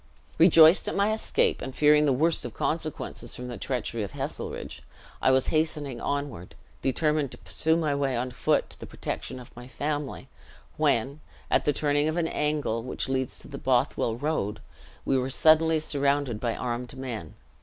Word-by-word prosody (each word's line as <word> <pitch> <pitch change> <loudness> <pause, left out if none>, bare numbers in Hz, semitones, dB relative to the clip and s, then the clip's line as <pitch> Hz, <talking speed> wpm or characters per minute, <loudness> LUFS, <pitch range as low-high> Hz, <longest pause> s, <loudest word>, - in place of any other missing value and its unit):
"Rejoiced 165 0 +7
at - - -2
my 200 +2 +2
escape, 220 - 0
and 130 - -6
fearing 150 0 +5
the 145 - +3
worst 155 +6 +2
of - - -6
consequences 155 -2 -3
from 125 0 -6
the 120 - -6
treachery 120 -3 -2
of 100 - -5
Heselrigge, - - -5 0.4
I - - +4
was 130 0 +3
hastening 150 -5 0
onward, 140 -13 -4 0.3
determined 150 +1 +1
to - - -10
pursue 160 +1 0
my 155 -3 0
way 140 -3 0
on 125 +1 -2
foot - - 0
to - - -15
the - - -8
protection - - -5
of 125 - -14
my 120 +1 -10
family, 145 +3 -4 0.5
when, 135 +6 +1 0.3
at - - +3
the 150 - +4
turning 145 +1 +1
of 155 +2 -1
an 170 -2 +1
angle 150 -8 -1
which 125 +2 -4
leads 130 -1 -1
to - - -13
the - - -8
Bothwell 115 - +1
road, 115 -7 -2 0.5
we 135 - +2
were 130 +1 -2
suddenly 160 +3 +4
surrounded 140 -5 0
by 115 -1 -1
armed 125 +1 -4
men. 115 -11 -6
140 Hz, 175 wpm, -27 LUFS, 125-155 Hz, 0.5 s, Rejoiced